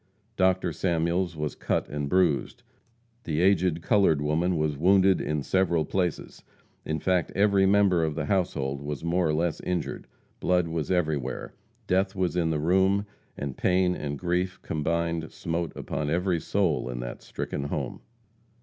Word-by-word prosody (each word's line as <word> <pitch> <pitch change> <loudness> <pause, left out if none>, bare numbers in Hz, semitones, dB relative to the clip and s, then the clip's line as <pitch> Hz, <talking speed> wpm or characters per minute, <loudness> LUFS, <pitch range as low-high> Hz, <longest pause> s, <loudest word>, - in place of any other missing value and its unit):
Dr. 95 -2 +2
Samuels 85 0 0
was 75 -1 -2
cut - - -1
and 75 -1 -3
bruised; 90 -5 +1 0.6
the 80 -1 -2
aged 90 -3 +2
colored 95 -7 +3
woman 80 +4 +1
was 75 -1 0
wounded 95 +4 +4
in 75 -1 -2
several 85 -3 +1
places; 90 0 -2 0.4
in 80 - -2
fact, 90 -2 +1
every 100 -1 +4
member 95 -4 +4
of 80 -2 -1
the 75 -2 -2
household 75 -8 -1
was 75 +1 -5
more 85 +1 +1
or 75 - +1
less 85 0 0
injured. 90 -3 -3 0.3
Blood 90 -1 +2
was 80 -2 -3
everywhere. 75 -8 -1 0.3
Death 95 +1 +1
was 90 -2 0
in 85 -2 +1
the 80 - 0
room; 95 +5 +2 0.3
and 70 -2 -4
pain 90 0 +2
and 70 -1 -4
grief 90 +3 -1
combined 85 +1 -1
smote 85 -1 -3
upon 75 +1 -3
every 90 +1 +1
soul 90 -8 0
in - - -4
that - - -6
stricken 70 - -4
home. 70 - -4
85 Hz, 155 wpm, -27 LUFS, 75-95 Hz, 0.6 s, wounded